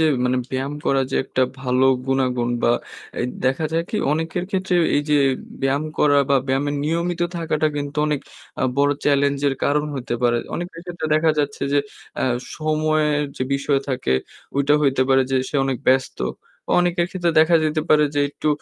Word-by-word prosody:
যে 160 - +4 0.2
মানে 125 +1 +1
ব্যায়াম 135 +2 -2
করা 135 - +3
যে - - 0
একটা 130 - 0 0.2
ভালো 130 0 +1 0.2
গুনাগুন 125 -2 0
বা - - +4 0.5
এ - - 0 0.2
দেখা 135 +4 +1
যায় 165 - +1
কি 215 - -2 0.2
অনেকের 165 +3 -2
ক্ষেত্রে 190 -1 -1 0.2
এইযে 150 +1 +1 0.5
ব্যায়াম 140 +3 +1
করা 145 -1 +4
বা 140 - +5
ব্যায়ামের 140 +2 0
নিয়মিত 170 +2 -1 0.2
থাকাটা 155 -2 0
কিন্তু 145 +1 -4
অনেক 150 -2 0 0.4
আ - - +1 0.2
বড় 145 0 +4
চ্যালেঞ্জের 140 -1 +2
কারণ 150 +1 +2
হইতে 120 -2 -3
পারে। 120 -1 +3 0.2
অনেকের 175 -1 -5
ক্ষেত্রে 175 -3 -5
দেখা 160 +1 +3
যাচ্ছে 145 -1 -1
যে 145 - +4 0.4
আ - - +1 0.3
সময়ের 155 -1 +1
যে - - -2
বিষয় 140 0 +1
থাকে 130 - -1 0.4
ঐটা 140 +1 +3
হইতে 135 -2 +3
পারে 135 0 +5
যে 135 - +2
সে - - -14
অনেক 135 -2 -1
ব্যস্ত। 130 0 +2 0.6
অনেকের 175 -1 +1
ক্ষেত্রে 175 -2 0
দেখা 165 +2 +5
যেতে 155 0 0
পারে 150 0 +5
যে 145 - +2
একটু 155 - -3
145 Hz, 175 wpm, -21 LUFS, 135-155 Hz, 0.6 s, বা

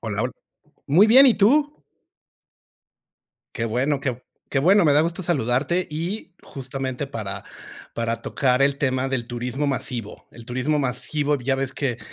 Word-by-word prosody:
Hola, 105 -1 -3
hol 125 - -2 0.6
Muy 180 +9 +6
bien, 260 +5 +8
¿y 245 - +6
tú? 290 +9 +2 1.7
Qué 115 -3 -2
bueno, 135 +5 0
qué 130 -2 -3 0.3
qué 135 - 0
bueno. 185 +7 +5
Me 145 - +5
da 150 +2 +5
gusto 170 +3 -3
saludarte, 150 +2 0
y 175 +5 -5
justamente 135 0 -5
para 110 -7 -6 0.5
para 115 0 -2
tocar 130 -1 +1
el 140 0 +2
tema 130 -1 0
del 130 -3 -2
turismo 125 +4 -3
masivo. 125 -5 -4
El 115 -1 -13
turismo 130 +4 -1
masivo 145 +2 -1
ya 135 +2 0
ves 135 0 -2
que 125 -4 -2
135 Hz, 155 wpm, -23 LUFS, 125-155 Hz, 1.7 s, bien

